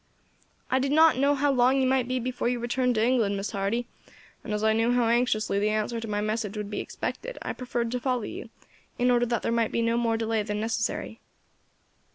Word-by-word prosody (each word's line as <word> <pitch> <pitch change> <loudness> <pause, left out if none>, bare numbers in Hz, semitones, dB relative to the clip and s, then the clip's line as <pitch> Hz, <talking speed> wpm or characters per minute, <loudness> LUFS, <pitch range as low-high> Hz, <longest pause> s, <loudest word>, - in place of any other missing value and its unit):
"I 260 - +3
did 270 +1 0
not 315 -1 +5
know 285 +1 +3
how 285 +1 +2
long 260 +1 +3
you 265 - +2
might 260 -1 +2
be 255 0 -1
before 250 0 -2
you 245 - 0
returned 245 +1 0
to 220 +1 +2
England, 230 -5 +2
Miss 195 +1 -4
Hardy, 205 +4 -1 0.6
and - - -6
as 210 0 -1
I 220 0 +4
knew 225 +2 +2
how 245 -2 +2
anxiously 230 -4 +1
the 210 +1 +1
answer 215 +2 -1
to 225 - -6
my 205 -1 -1
message 215 -1 -2
would 210 0 -5
be - - -3
expected, - - -5
I - - -3
preferred 240 -2 -3
to 250 - -1
follow 250 -2 -1
you, - - -7 0.5
in 250 0 +3
order 240 0 +3
that 235 0 -1
there - - 0
might 230 -1 +1
be 230 - 0
no 230 0 +1
more 230 -1 +1
delay 225 -1 0
than 210 0 -3
necessary." 220 0 -2
235 Hz, 225 wpm, -27 LUFS, 220-250 Hz, 0.6 s, not